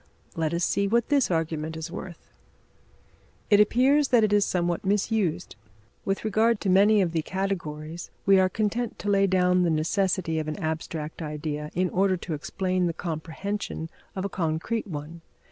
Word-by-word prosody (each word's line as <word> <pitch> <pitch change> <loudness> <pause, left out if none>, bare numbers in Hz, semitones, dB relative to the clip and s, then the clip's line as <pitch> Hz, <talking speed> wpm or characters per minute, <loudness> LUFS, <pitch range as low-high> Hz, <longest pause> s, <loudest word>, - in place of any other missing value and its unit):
Let 160 -2 0
us 170 +1 0
see 200 - +1
what 235 +3 +1
this 285 -3 +3
argument 160 -1 -2
is 160 +1 -6
worth. 185 -2 -9 1.2
It 205 - +7
appears 265 +7 +4
that 240 -3 +4
it 210 -1 +2
is 205 -1 +5
somewhat 175 -1 -1
misused. 195 -3 0 0.5
With 195 +2 -1
regard 220 +1 +2
to 195 - +1
many 205 +2 +5
of 170 - -1
the 165 -1 0
categories, 165 -3 -4 0.2
we 195 -1 +6
are 185 0 +3
content 220 +4 -2
to 205 - -4
lay 195 0 +4
down 180 -1 +3
the 175 - +2
necessity 165 +1 0
of 155 - -4
an 155 - -3
abstract 160 0 -4
idea 150 -1 -4
in 180 +1 +1
order 190 0 +2
to 170 -1 -5
explain 185 +4 -1
the 170 - -1
comprehension 165 +1 -4 0.2
of 190 0 -3
a - - +1
concrete 175 +6 -2
one. 160 0 -7
185 Hz, 170 wpm, -26 LUFS, 160-200 Hz, 1.2 s, It